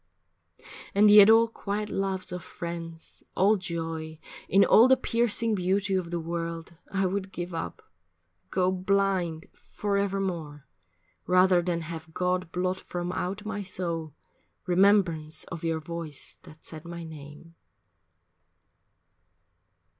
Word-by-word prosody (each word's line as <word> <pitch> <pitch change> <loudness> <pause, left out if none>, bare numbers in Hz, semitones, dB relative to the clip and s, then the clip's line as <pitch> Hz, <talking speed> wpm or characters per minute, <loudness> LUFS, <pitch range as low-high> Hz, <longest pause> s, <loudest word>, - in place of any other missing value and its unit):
And 205 +1 +6
yet 210 0 +9
all 225 +1 +6
quiet 210 -1 -4
loves 190 -2 -2
of 180 0 -5
friends, 165 -1 -8
all 200 +4 +4
joy 165 -3 -4 0.3
In 195 +2 +5
all 230 +3 +7
the 260 0 +5
piercing 230 -2 +1
beauty 195 +1 0
of 185 -3 -1
the 175 0 -2
world 165 0 -5 0.2
I 195 -1 +1
would 190 +1 -2
give 175 -1 -5
up 165 - -5 0.7
go 185 - +1
blind 185 -3 0
forevermore, 195 -7 -3 0.6
Rather 185 0 +5
than 170 -1 -1
have 160 0 -8
God 180 -1 -1
blot 185 +1 -1
from 175 0 -4
out 195 +4 -4
my 210 -1 -3
soul 170 -5 -4 0.5
Remembrance 180 -4 +2
of 165 -2 -6
your 165 -1 0
voice 165 -2 -8
that 155 - -16
said 160 -2 -8
my 170 0 -7
name. 155 +1 -11
180 Hz, 125 wpm, -27 LUFS, 165-195 Hz, 0.7 s, yet